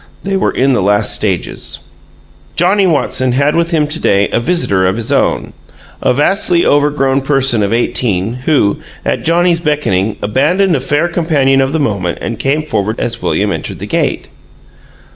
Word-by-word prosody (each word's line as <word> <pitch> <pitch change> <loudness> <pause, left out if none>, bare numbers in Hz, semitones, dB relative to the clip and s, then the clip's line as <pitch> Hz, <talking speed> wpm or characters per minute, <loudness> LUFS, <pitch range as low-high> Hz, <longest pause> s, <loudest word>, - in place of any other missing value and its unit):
They 195 0 -2
were 190 - +1
in 135 +1 +1
the 120 - +1
last 105 +2 +1
stages. 95 -5 -3 0.7
Johnnie 190 +3 +3
Watson 130 -5 0
had 140 +3 +1
with 170 0 +1
him 160 -3 +1
to 150 +2 -2
day 100 0 +2
a - - 0
visitor 115 - +1
of 95 - 0
his 115 -1 -3
own - - 0 0.5
a - - +2
vastly 170 +5 +1
overgrown 145 -2 +2
person 135 -4 +1
of 100 0 0
eighteen, 115 -3 0
who, 135 -10 +2 0.3
at - - -1
Johnnie's 170 +1 +2
beckoning, 130 - -1
abandoned 155 - +1
a - - 0
fair 145 +5 0
companion 150 -6 +1
of 135 0 0
the 160 - -1
moment 100 - -1
and 115 -2 -5
came 145 +3 0
forward 110 -7 -2
as 115 0 -3
William - - 0
entered - - -5
the - - -6
gate. - - -1
135 Hz, 170 wpm, -13 LUFS, 110-160 Hz, 0.7 s, Johnnie